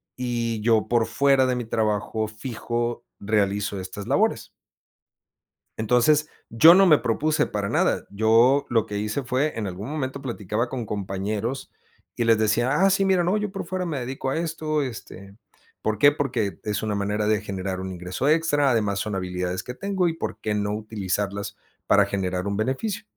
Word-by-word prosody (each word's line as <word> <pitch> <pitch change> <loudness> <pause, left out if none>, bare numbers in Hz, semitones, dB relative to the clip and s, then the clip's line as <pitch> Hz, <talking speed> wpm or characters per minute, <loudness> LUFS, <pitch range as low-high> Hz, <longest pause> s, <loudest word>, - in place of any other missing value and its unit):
y 120 -3 -2
yo, 110 0 +2
por 120 -1 +3
fuera 135 -1 +3
de 130 -1 +1
mi 120 -1 -3
trabajo 110 0 -1
fijo, 120 +1 -4
realizo 100 -1 0
estas 95 +3 -7
labores. 140 - +1 1.3
Entonces, 125 +7 +3 0.2
yo 160 +10 +8
no 195 +1 +6
me 155 -5 +6
propuse 155 +6 +1
para 100 -1 -3
nada, - - +1
yo 115 +7 +4
lo 115 -2 +2
que 105 - -4
hice 105 +6 -2
fue, 130 +5 0
en 110 - -2
algún 95 +6 -6
momento 140 -2 -4
platicaba 115 -2 -3
con 125 -4 -4
compañeros 105 +5 -3 0.5
y 120 - 0
les 115 -1 +4
decía: 120 +7 +2
"Ah, 195 - +6
sí, 195 +1 +2
mira, 190 -2 +3
no, 180 +4 +1
yo 210 -2 -2
por 195 - -5
fuera 185 +1 -3
me 155 -6 -3
dedico 130 +2 -4
a 135 - -1
esto", 155 -2 -2
este, 100 -5 -8 0.5
¿por 110 -1 -1
qué?, 145 +5 +6
"porque 120 - -2
es 105 -1 -2
una 110 -1 -1
manera 105 +1 -1
de 105 -2 +1
generar 95 -2 -4
un 95 0 -5
ingreso 90 +8 -4
extra, 150 -3 +3
además 105 -4 +1
son 105 -2 -3
habilidades 90 0 -3
que 125 - -7
tengo 190 +2 0
y, 165 - -2
¿por - - -5
qué 105 - -2
no 105 0 -1
utilizarlas 100 -2 -3 0.3
para 100 -1 +4
generar 95 -2 -2
un 100 0 -1
beneficio?". 135 - -2
115 Hz, 180 wpm, -24 LUFS, 105-140 Hz, 1.3 s, yo